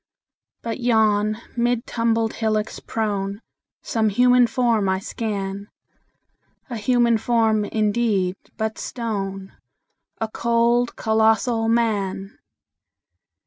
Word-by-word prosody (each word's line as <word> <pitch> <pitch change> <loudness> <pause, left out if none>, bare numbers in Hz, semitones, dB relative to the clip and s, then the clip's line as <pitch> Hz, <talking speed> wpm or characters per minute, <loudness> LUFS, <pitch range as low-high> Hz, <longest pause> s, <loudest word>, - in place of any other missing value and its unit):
But 230 +1 -4
yon, 215 -3 +2 0.2
mid 240 0 0
tumbled 230 -2 0
hillocks 215 -1 -1
prone, 200 -2 -3 0.4
Some 220 -2 +1
human 245 +3 +4
form 230 -5 +1
I 190 - +1
scan 200 -1 -4 1.0
A 235 - -3
human 235 +1 +2
form, 220 -2 +2
indeed, 210 -4 0 0.2
but 220 0 -3
stone: 195 -5 -4 0.7
A 225 - -1
cold, 235 +2 +1
colossal 225 +1 +2
Man! 205 -4 -1
220 Hz, 95 wpm, -22 LUFS, 205-235 Hz, 1.0 s, human